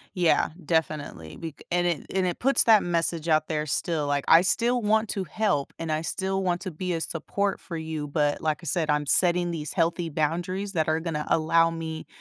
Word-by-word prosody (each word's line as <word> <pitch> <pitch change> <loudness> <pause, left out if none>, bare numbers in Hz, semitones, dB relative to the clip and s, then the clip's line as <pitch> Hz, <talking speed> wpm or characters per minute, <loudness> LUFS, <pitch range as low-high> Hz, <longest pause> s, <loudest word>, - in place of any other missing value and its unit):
Yeah, 175 -3 +3 0.2
definitely 150 - -2
bec 165 -3 -8
and 175 0 +2
it 170 -5 -1
and 190 - +2
it 175 -2 -2
puts 270 +2 +3
that 220 -3 +6
message 170 -1 -1
out 155 0 +3
there 155 -1 -1
still, 150 0 -1
like, 145 -1 0
"I 165 +1 +8
still 240 +6 +2
want 220 +1 +2
to 195 - -2
help 185 -6 -1
and 165 -1 -4
I 155 +1 0
still 190 +3 -2
want 175 -1 0
to 185 - -5
be 180 +3 -3
a 165 - -2
support 195 +5 -2
for 170 - -7
you, 160 -2 -4
but 145 0 0
like 155 -1 0
I - - -9
said, 160 +1 0
I'm 150 0 +1
setting 175 +2 +3
these 150 -3 -4
healthy 170 -1 0
boundaries 175 +6 -2
that 160 -2 0
are 160 +1 +1
gonna 160 -3 -3
allow 165 +1 +3
me 160 -1 -6
165 Hz, 210 wpm, -26 LUFS, 155-180 Hz, 0.2 s, I